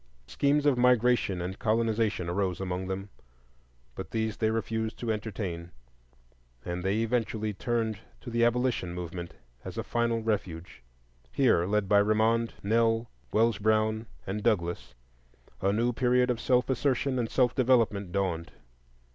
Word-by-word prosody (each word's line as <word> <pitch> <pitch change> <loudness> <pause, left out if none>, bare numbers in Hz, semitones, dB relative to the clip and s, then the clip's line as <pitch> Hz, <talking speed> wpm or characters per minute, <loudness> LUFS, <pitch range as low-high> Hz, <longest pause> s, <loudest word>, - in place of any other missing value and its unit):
Schemes 145 - +1
of 135 -4 +3
migration 120 -7 +3
and 95 +2 -5
colonization 110 -4 +1
arose 90 0 -1
among 95 -1 -3
them; 95 +1 -4 0.8
but - - -7
these 110 -1 -2
they 110 - +1
refused 110 0 -2
to 115 -2 -2
entertain, 100 -6 -5 1.0
and 85 +1 -3
they 100 +4 +1
eventually 110 -2 -1
turned 110 0 -1 0.2
to 120 - -8
the 120 0 +2
Abolition 120 -7 +1
movement 85 0 -6 0.3
as - - -8
a - - -1
final 115 -1 0
refuge. 95 - -3 0.5
Here, 115 -10 +3
led 105 0 +1
by 100 +1 +5
Remond, 110 +2 +2
Nell, 115 +2 +1 0.2
Wells 115 -1 +2
Brown, 110 +1 +1 0.2
and 100 +2 -3
Douglass, 90 - -1 0.7
a 95 - +2
new 120 +4 +1
period 125 +1 +2
of 115 -1 -3
self 125 -1 +2
assertion 130 0 0
and 115 -2 -1
self 125 -2 +2
development 115 -7 +2
dawned. 85 -6 -2
110 Hz, 140 wpm, -29 LUFS, 95-120 Hz, 1.0 s, by